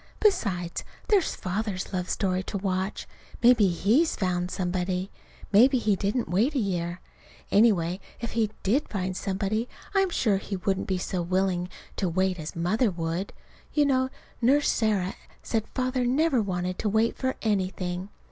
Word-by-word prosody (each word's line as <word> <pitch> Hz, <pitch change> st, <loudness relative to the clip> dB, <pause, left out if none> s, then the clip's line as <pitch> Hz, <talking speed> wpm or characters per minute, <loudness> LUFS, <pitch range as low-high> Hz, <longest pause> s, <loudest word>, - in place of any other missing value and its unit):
Besides, 185 Hz, -, +1 dB, 0.3 s
there's 405 Hz, -5 st, +3 dB
Father's 195 Hz, 0 st, -3 dB
love 180 Hz, 0 st, -2 dB
story 185 Hz, -2 st, 0 dB
to 200 Hz, -, -3 dB
watch. 190 Hz, +1 st, -2 dB, 0.4 s
Maybe 235 Hz, -4 st, +6 dB
he's 215 Hz, -, +2 dB
found 180 Hz, -2 st, -1 dB
somebody. 185 Hz, +1 st, -2 dB, 0.4 s
Maybe 250 Hz, +6 st, +6 dB
he 215 Hz, -4 st, +2 dB
didn't 210 Hz, +5 st, -1 dB
wait 225 Hz, -, +1 dB
a -, -, +2 dB
year. 180 Hz, -5 st, -1 dB, 0.5 s
Anyhow, 190 Hz, -5 st, +4 dB, 0.2 s
if 235 Hz, -, -4 dB
he 225 Hz, -2 st, +1 dB
did 250 Hz, +10 st, +1 dB
find 185 Hz, -2 st, -2 dB
somebody 200 Hz, +5 st, -1 dB, 0.2 s
I'm 390 Hz, -1 st, +3 dB
sure 215 Hz, -, +2 dB
he 195 Hz, +1 st, -4 dB
wouldn't 190 Hz, +1 st, -1 dB
be 190 Hz, -, 0 dB
so 180 Hz, 0 st, -2 dB
willing 180 Hz, 0 st, 0 dB, 0.3 s
to 190 Hz, -, 0 dB
wait 185 Hz, +1 st, 0 dB
as 155 Hz, 0 st, -6 dB
Mother 210 Hz, +8 st, +2 dB
would. 170 Hz, +1 st, -3 dB, 0.4 s
You 295 Hz, -1 st, +4 dB
know 260 Hz, -2 st, +2 dB, 0.3 s
Nurse 280 Hz, +5 st, +4 dB
Sarah 205 Hz, -5 st, +1 dB, 0.3 s
said 220 Hz, -2 st, -1 dB
Father 255 Hz, -1 st, 0 dB
never 265 Hz, +1 st, +3 dB
wanted 180 Hz, -2 st, -2 dB
to 215 Hz, -, 0 dB
wait 220 Hz, +2 st, +2 dB
for 260 Hz, 0 st, -1 dB
anything. 185 Hz, -3 st, -1 dB
195 Hz, 155 wpm, -27 LUFS, 185-235 Hz, 0.5 s, Maybe